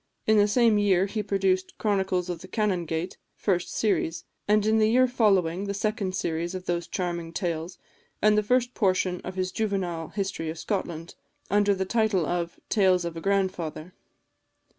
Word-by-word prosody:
In 220 0 +4
the 205 - +5
same 225 -1 +4
year 195 -2 +3
he 210 +2 -3
produced 195 -2 0
"Chronicles 190 -4 0
of 175 -2 -4
the 185 - -10
Canongate," 180 -5 -1 0.2
first 180 -4 -1
series; 180 -6 0 0.2
and 210 0 +3
in 220 +1 +3
the 215 0 +4
year 255 +3 +4
following, 195 -7 +2
the 200 0 -3
second 200 -2 -1
series 170 +1 -2
of 185 0 -6
those 175 -1 -2
charming 170 -2 -3
tales, 170 0 -3 0.4
and 210 0 +4
the 210 - +4
first 245 +3 +1
portion 185 -3 +1
of 185 - -6
his 185 -1 -1
juvenile 185 -7 -2
history 195 -5 -3
of 160 - -5
Scotland, 170 -4 -4 0.4
under 205 0 +3
the 190 0 -2
title 215 -4 +1
of 170 +1 -3
"Tales 185 -4 +3
of 170 -1 -4
a 165 - -6
Grandfather." 185 -4 -1
190 Hz, 170 wpm, -26 LUFS, 175-210 Hz, 0.4 s, the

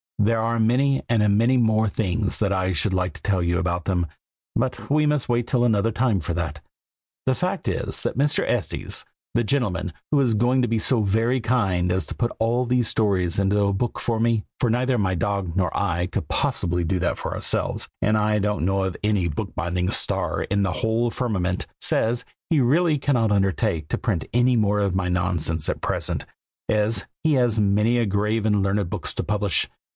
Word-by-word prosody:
There 110 +2 +2
are 115 +1 0
many 130 +5 +2
and 105 -3 +3
many 120 +4 +3
more 110 -2 +3
things 100 0 -1
that 100 -2 +1
I 95 -1 0
should 95 +4 0
like 90 0 0
to - - -12
tell 95 -3 +1
you 85 0 +1
about 90 -2 -2
them, 90 -3 0 0.5
but 125 +2 -2
we 150 +2 +3
must 150 -3 0
wait 120 0 +1
till 125 -2 +1
another 110 -2 +2
time 115 -3 +1
for 85 - -4
all - - -2
that. 80 -2 -3 0.7
The - - +4
fact - - -2
is - - -1
that - - -3
Mr. 145 +2 +2
Estes, 100 -11 -1 0.3
the 120 - +3
gentleman 100 - -1 0.2
who 145 - +4
is 125 -4 +2
going 125 +4 +2
to - - +2
be 115 0 0
so 115 +1 +3
very 115 +5 +1
kind 95 -7 +1
as 95 +1 0
to - - -6
put 120 -1 -1
all 120 +3 +1
these 125 -1 +1
stories 95 -7 +1
into 100 +1 +2
a 100 0 +2
book 120 +5 -2
for 115 -2 -1
me, 115 -2 +1 0.2
(for 120 - +1
neither 125 +2 +1
my 95 -2 +1
dog 95 -1 -2
nor 90 -1 0
I 90 -3 0
could - - -4
possibly 90 0 0
do 90 +3 0
that 85 - 0
for - - -4
ourselves, - - -1
and 105 +1 +2
I 105 0 +2
don't 105 -3 0
know 95 +1 +1
of 95 -2 -3
any 105 -4 +1
book 75 - -4
binding 90 +2 -1
star - - 0
in 100 +1 0
the 95 -2 +1
whole 115 0 0
firmament,) 95 -8 -2
says 120 +2 +1 0.3
he 160 - +4
really 155 +5 +3
cannot 120 -6 +1
undertake 95 -5 0
to - - -1
print - - -1
any 125 +1 +3
more 105 -2 +2
of 100 -3 0
my 90 -1 0
nonsense 85 -3 0
at - - -3
present, - - -2 0.4
as 105 -1 +1 0.2
he 160 -1 +3
has 120 -5 +2
many 105 +4 +2
grave 105 +2 0
and 105 -2 +2
learned 100 0 0
books - - -4
to - - -2
publish. 105 -4 0
105 Hz, 205 wpm, -23 LUFS, 95-120 Hz, 0.7 s, The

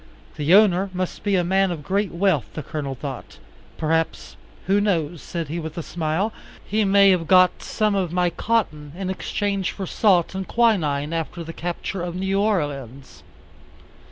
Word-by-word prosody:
The 155 +5 +4
owner 195 -2 +4
must 185 0 -3
be 205 -2 +1
a 180 - +2
man 190 +2 +2
of 165 -4 -5
great 195 +4 0
wealth, 170 - +1
the 155 - -4
Colonel 140 -1 -4
thought; 135 -1 -7 0.4
perhaps, 160 0 -1 0.3
who 200 +2 +3
knows, 170 -6 0
said 170 -3 -5
he 165 +4 -4
with 160 +1 -7
a 170 - -3
smile, 175 +7 -1 0.3
he 215 +2 +1
may 200 0 +6
have 170 -3 +1
got 185 -1 +5
some 215 -1 0
of 185 -4 0
my 180 0 +1
cotton 155 -12 -1
in 190 0 -3
exchange 195 -1 -2
for 195 - -5
salt 185 -3 +2
and 190 0 -4
quinine 160 -11 +1
after 165 +1 -3
the 165 0 -8
capture 175 +2 -4
of 175 0 -4
New 190 +1 0
Orleans. 140 - -2
180 Hz, 170 wpm, -23 LUFS, 155-195 Hz, 0.4 s, may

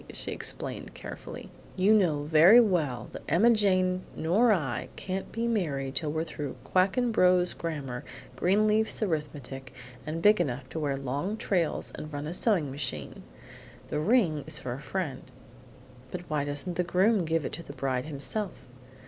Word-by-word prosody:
she - - +1
explained - - -3
carefully. - - -9 0.2
"You 195 +3 +4
know 165 -9 +3
very 160 +9 +7
well 170 - +1
that - - -7
Emma 210 +10 +5
Jane 185 -4 +2
nor 210 +9 +3
I 145 - -1
can't 190 0 -4
be 230 +1 -2
married 145 - -1
till 150 -1 -1
we're 160 +1 -1
through 150 -4 -6
Quackenbos's 185 -2 +3
Grammar, 140 -7 -5 0.3
Greenleaf's 215 - +2
Arithmetic, 140 - -4 0.3
and 155 +2 -4
big 210 -2 +6
enough 130 -4 -3
to 160 - -4
wear 145 -3 -1
long 140 +10 -3
trails 175 -7 0
and 155 - -7
run 145 0 -4
a 160 - -4
sewing 180 - +2
machine. 130 - -3 0.7
The - - -1
ring 165 - +2
is - - -1
for 125 - -4
a 135 - -7
friend." 155 -4 -3 1.1
"Why 150 -2 -1
doesn't 145 +5 -4
the 180 - +2
groom 190 +3 +3
give 160 -2 0
it - - -3
to 170 - -5
his 140 -4 -11
bride 130 0 -2
himself?" 165 +7 -4
165 Hz, 155 wpm, -28 LUFS, 145-195 Hz, 1.1 s, very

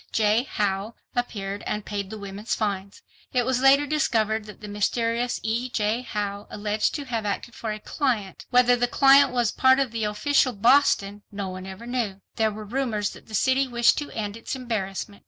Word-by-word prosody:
J. 220 +4 +2
Howe, 205 +2 -1 0.2
appeared 205 -5 -3
and 210 -1 -3
paid 200 -2 -4
the 220 - -6
women's 200 +2 -4
fines. 200 -2 -3 0.3
It 245 -2 +2
was 255 -1 +1
later 275 +2 +6
discovered 225 -7 +1
that 210 - -11
the 210 - -8
mysterious 230 +4 0
E. 235 +3 -1
J. 220 +1 0
Howe 205 -4 -4
alleged 210 +1 -1
to 290 - -4
have 235 -4 -2
acted 210 +3 -3
for 225 -3 -4
a 215 - -3
"client." 220 -6 -2
Whether 245 0 +5
the 245 0 +1
"client" 275 +2 +6
was 240 -3 +1
a - - -16
part 260 0 +7
of 270 -4 0
Official 230 +5 +1
Boston, 205 -3 +3
no 200 -2 -4
one 185 0 -7
ever 190 +4 -9
knew. 235 -6 -2 0.2
There 220 -1 +3
were 215 0 -7
rumors 220 -3 -1
that - - -14
the 220 - -5
city 265 +5 +2
wished 240 -1 +3
to 295 - -5
end 210 -2 -3
its 230 +3 -5
embarrassment. 210 -5 -4
220 Hz, 195 wpm, -25 LUFS, 205-250 Hz, 0.3 s, part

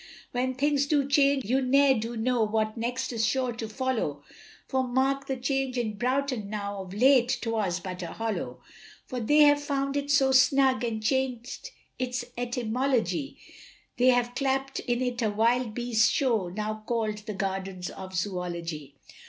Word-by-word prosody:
When 255 +1 -1
things 285 +1 +1
do 285 -2 +2
change 280 -2 +3
you 260 +6 +1
ne'er 275 +1 +4
do 230 0 -3
know 245 +1 +1
what 215 0 0
next 245 +2 -3
is 225 -1 -1
sure 255 +2 +1
to 225 -1 -6
follow, 220 - -2 0.4
For 265 - +1
mark 265 +2 0
the 265 - -2
change 265 0 -1
in 225 -3 -1
Broughton 255 -2 -1
now, 200 -1 -4
of 185 -1 -9
late 250 +1 +4
'twas 215 -6 -1
but 180 +1 -6
a 175 - -4
hollow 225 -2 -4 0.4
For 255 - -5
they 295 +7 +4
have 290 -1 +6
found 275 -1 -1
it 285 0 -2
so 275 -2 +4
snug, 265 0 +4
and 220 -2 -2
chang'd 255 0 -2 0.3
its 250 -1 -2
etymology, 245 +3 -1 0.6
They 250 - +4
have 245 -1 +3
clapt 270 0 -1
in 245 0 -1
it 245 -1 -2
a 220 - +2
wild 225 +2 +1
beast's 240 -2 +2
show, 225 -9 +1
now 215 +3 -4
call'd 220 -3 -1
the 215 - -4
Gardens 190 -2 -3
of 190 -1 -9
Zoology. 170 -6 -4
245 Hz, 165 wpm, -27 LUFS, 215-265 Hz, 0.6 s, have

